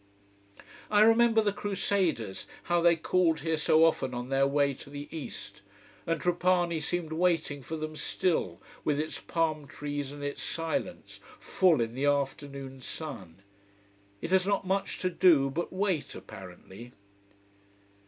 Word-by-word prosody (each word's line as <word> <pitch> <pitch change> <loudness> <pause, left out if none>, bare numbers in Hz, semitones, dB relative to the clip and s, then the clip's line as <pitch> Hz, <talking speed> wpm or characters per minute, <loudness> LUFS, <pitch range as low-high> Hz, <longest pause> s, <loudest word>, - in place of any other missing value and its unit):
I 210 -1 +4
remember 225 0 +5
the 205 -1 +1
Crusaders, 190 - -1 0.2
how 175 0 +1
they 170 0 +5
called 165 0 +1
here 160 -1 0
so 155 +1 +4
often 130 -6 +1
on 125 +1 -5
their 135 0 +3
way 140 0 +2
to 135 - -12
the 145 0 -7
East. 105 -10 -8 0.5
And 165 -1 0
Trapani 175 -1 +1
seems 170 0 -2
waiting 160 -4 +1
for 160 +5 -6
them 155 0 -5
still, 150 - -1 0.2
with 145 -1 +1
its 155 +1 -3
palm 155 -3 -1
trees 145 -2 -5
and 145 0 -8
its 145 0 -4
silence, 165 -1 -4 0.2
full 175 -8 +3
in 115 0 -2
the 135 +3 -1
afternoon 140 -1 -2
sun. 100 - -8 0.8
It 165 - -4
has 190 0 +3
not 200 -1 +1
much 195 +1 -1
to 185 - +1
do 155 -7 +4
but 170 +5 -3
wait, 185 -5 -1
apparently. 95 +5 -11
155 Hz, 145 wpm, -29 LUFS, 140-175 Hz, 0.8 s, remember